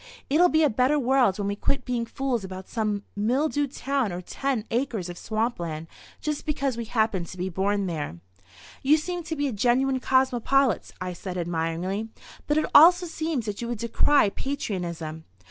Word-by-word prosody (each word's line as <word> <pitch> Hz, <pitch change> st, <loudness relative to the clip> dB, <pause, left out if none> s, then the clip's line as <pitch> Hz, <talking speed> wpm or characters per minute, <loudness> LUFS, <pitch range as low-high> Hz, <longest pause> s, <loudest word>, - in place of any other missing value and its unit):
It'll 350 Hz, +5 st, +5 dB
be 315 Hz, -1 st, +3 dB
a 300 Hz, -, +5 dB
better 255 Hz, +6 st, +2 dB
world 255 Hz, -6 st, +3 dB
when 200 Hz, -1 st, -2 dB
we 200 Hz, -, -1 dB
quit 270 Hz, +5 st, -1 dB
being 240 Hz, -2 st, -1 dB
fools 255 Hz, -3 st, -2 dB
about 190 Hz, 0 st, -7 dB
some 210 Hz, -3 st, -2 dB
mildewed 275 Hz, +6 st, 0 dB
town 275 Hz, -6 st, -1 dB
or 175 Hz, -, -4 dB
ten 245 Hz, +5 st, -2 dB
acres 230 Hz, -7 st, -1 dB
of 175 Hz, -, -7 dB
swampland 195 Hz, -9 st, -2 dB, 0.3 s
just 300 Hz, -1 st, -3 dB
because 280 Hz, -4 st, 0 dB
we 235 Hz, 0 st, -4 dB
happened 220 Hz, -6 st, 0 dB
to 185 Hz, -, -9 dB
be 180 Hz, +1 st, -2 dB
born 195 Hz, +2 st, 0 dB
there." 155 Hz, -, -4 dB, 0.6 s
"You 290 Hz, +3 st, +5 dB
seem 350 Hz, +3 st, -3 dB
to 325 Hz, -1 st, -4 dB
be 290 Hz, -1 st, 0 dB
a 260 Hz, -, -3 dB
genuine 255 Hz, +5 st, +2 dB
cosmopolite," 260 Hz, -2 st, +2 dB
I 185 Hz, 0 st, -4 dB
said 180 Hz, +1 st, -6 dB
admiringly. 175 Hz, +5 st, -2 dB, 0.4 s
"But 295 Hz, -, +2 dB
it 310 Hz, -, +2 dB
also 355 Hz, +4 st, +8 dB
seems 315 Hz, -7 st, -2 dB
that 210 Hz, 0 st, -4 dB
you 235 Hz, -, -3 dB
would 240 Hz, -1 st, -3 dB
decry 235 Hz, +2 st, +3 dB
patriotism." 170 Hz, -, -4 dB
235 Hz, 180 wpm, -26 LUFS, 190-275 Hz, 0.6 s, also